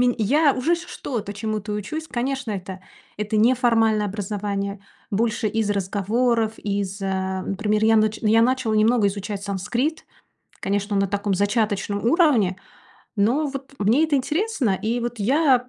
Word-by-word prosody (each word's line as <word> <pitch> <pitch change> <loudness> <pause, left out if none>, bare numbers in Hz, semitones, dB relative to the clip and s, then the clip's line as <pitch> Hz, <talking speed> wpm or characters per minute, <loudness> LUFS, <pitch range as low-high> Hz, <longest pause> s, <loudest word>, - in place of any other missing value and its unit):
ме 250 -1 +3
я 285 +7 +3
уже 320 +7 +2
ч 345 +1 -9
что-то 225 - -5
чему-то 210 0 -3
учусь. 215 +11 -4
Конечно, 255 0 -2
это 190 -1 -6 0.4
это 210 +1 -2
неформальное 225 -2 +3
образование. 200 0 -3 0.3
Больше 220 +1 0
из 220 -1 -1
разговоров, 215 +4 0
из, 200 -1 -3
э 190 -1 -2
Например, 210 +2 0
я 225 0 +5
нач 215 0 +2
я 225 +1 +4
начала 250 -3 +1
немного 215 0 +3
изучать 200 0 -5
санскрит. 235 - -2 0.6
Конечно, 200 +1 -1
на 195 -1 +2
таком 200 0 -1
зачаточном 205 0 0
уровне. 245 - +3 0.6
Но 245 +10 +2
вот 275 -1 -7
мне 230 +10 +3
это 300 -3 +1
интересно. 300 - 0
И 230 +3 0
вот 240 -1 -4
я 255 +1 +3
215 Hz, 145 wpm, -23 LUFS, 200-250 Hz, 0.6 s, я